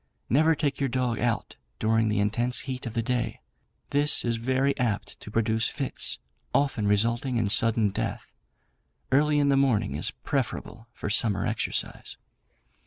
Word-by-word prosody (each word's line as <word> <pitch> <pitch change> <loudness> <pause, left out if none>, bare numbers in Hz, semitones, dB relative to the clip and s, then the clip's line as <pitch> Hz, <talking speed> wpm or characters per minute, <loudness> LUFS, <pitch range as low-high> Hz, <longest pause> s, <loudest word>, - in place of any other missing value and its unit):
Never 160 +5 +4
take 140 -3 -2
your 135 -1 0
dog 125 -2 -1
out 120 -1 -2 0.2
during 110 0 +1
the 105 -1 0
intense 115 +5 0
heat 130 -2 -5
of 115 - -7
the 115 - 0
day; 120 -2 -2 0.5
this 145 -1 +4
is 115 -1 0
very 130 +4 0
apt 115 -5 -2
to - - -10
produce 110 +1 +1
fits, 140 -3 -2 0.4
often 135 -7 +1
resulting 115 +5 +1
in 115 -3 +1
sudden 115 -2 +4
death. - - -4 0.9
Early 150 +2 +3
in 145 -1 +3
the 140 - +3
morning 115 - +1
is 80 +9 +1
preferable 115 -2 -4
for 105 - -5
summer 105 -3 +2
exercise. - - -3
120 Hz, 155 wpm, -26 LUFS, 110-135 Hz, 0.9 s, Never